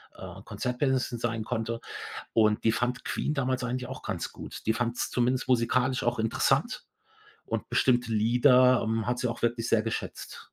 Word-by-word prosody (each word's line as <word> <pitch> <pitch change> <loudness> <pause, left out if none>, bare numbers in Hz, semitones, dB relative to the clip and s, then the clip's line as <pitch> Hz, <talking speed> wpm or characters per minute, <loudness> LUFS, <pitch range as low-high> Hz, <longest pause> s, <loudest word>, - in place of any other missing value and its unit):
äh, - - -9
Konzertpianisten 130 -1 -1
sein 115 -1 -2
konnte. 115 0 -3 0.5
Und 105 -1 +3
die 110 - +4
fand 120 +2 -1
Queen 150 - -2
damals 130 -2 -1
eigentlich 125 +1 -3
auch - - -7
ganz - - -4
gut. - - -9
Die 110 - +4
fand's 120 0 -1
zumindest 125 +1 +1
musikalisch 125 +1 +2
auch 120 0 0
interessant 135 - +1 0.6
und - - -3
bestimmte 120 -2 +2
Lieder, 125 +3 +5
ähm, 110 0 -1
hat 120 0 0
sie 125 - 0
auch 115 - -5
wirklich 120 0 0
sehr 110 -1 +4
geschätzt. 115 0 -5
120 Hz, 165 wpm, -28 LUFS, 115-125 Hz, 0.6 s, Lieder